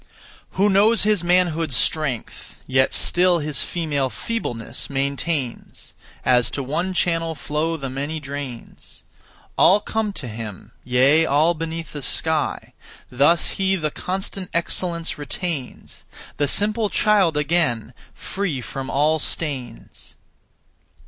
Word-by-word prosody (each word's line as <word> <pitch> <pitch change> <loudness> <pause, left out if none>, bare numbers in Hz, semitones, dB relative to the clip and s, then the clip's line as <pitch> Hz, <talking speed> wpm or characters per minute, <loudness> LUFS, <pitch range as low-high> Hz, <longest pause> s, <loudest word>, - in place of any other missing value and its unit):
1. - - -17
Who 200 +2 +4
knows 215 +4 +5
his 210 -4 +2
manhood's 170 -5 +2
strength, 135 -3 -2
Yet 130 0 +2
still 180 0 +3
his 150 -2 -2
female 145 -6 -1
feebleness 120 - -4
maintains; 140 -1 -3 0.3
As 125 -2 +3
to 140 +2 -4
one 175 +8 -2
channel 165 -2 0
flow 155 +3 -2
the 135 -3 -5
many 140 +4 -4
drains, 140 -4 -8 0.6
All 195 +3 +6
come 220 0 -2
to 140 - -5
him, 110 -2 -8
yea, 135 +6 +4
all 155 +5 +3
beneath 165 -1 -5
the 145 - -5
sky. 160 +2 -1 0.4
Thus 145 +7 +3
he 195 0 +1
the 155 -4 -2
constant 190 +2 -4
excellence 170 -1 0
retains; 145 -2 -5 0.3
The 145 - +1
simple 210 - +2
child 195 -9 +3
again, 145 -7 0 0.2
free 190 -9 -3
from 130 +2 -6
all 155 +3 +2
stains. 135 -7 -5
155 Hz, 120 wpm, -22 LUFS, 135-175 Hz, 0.6 s, All